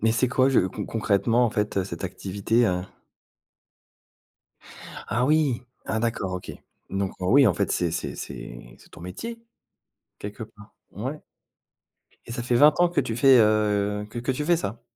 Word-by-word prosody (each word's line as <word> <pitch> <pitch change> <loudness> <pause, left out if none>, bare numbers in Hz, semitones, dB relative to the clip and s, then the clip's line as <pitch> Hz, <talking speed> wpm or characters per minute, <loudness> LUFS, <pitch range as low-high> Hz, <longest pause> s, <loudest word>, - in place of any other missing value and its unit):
Mais 115 +1 +3
c'est 120 +2 +1
quoi, 130 +1 +3
je 135 - +4
con 95 +1 -3
concrètement 115 +2 +1
en 120 - +1
fait, 105 -1 -2
heu, 95 - 0
cette 85 -1 -6
activité, 100 +5 0
heu? 90 -1 0 2.2
Ah, 120 +5 0
oui, 150 -5 +2 0.2
ah, 110 - -2
d'accord 110 -5 -2
OK. 90 0 -5 0.4
Donc, 95 0 -2
heu, 90 - -2
oui, 135 +6 +6
en 95 - +3
fait, - - -1
c'est 85 -2 0
c'est 85 - -4
c'est - - -9
c'est - - -19
ton - - -13
métier 230 - -7 0.8
quelque 105 +3 -7
part. 105 -1 -13 0.2
Ouais. 130 +9 -5 1.0
Et 115 - -7
ça 120 0 -4
fait 120 0 0
20 150 +3 +6
ans 175 - +5
que 175 - +1
tu 115 - -3
fais, 135 0 +6
heu 105 -1 +1
que 120 - -6
que 120 +3 -1
tu 150 +3 -3
fais 175 +2 +3
ça? 115 - -5
110 Hz, 180 wpm, -25 LUFS, 95-125 Hz, 2.2 s, oui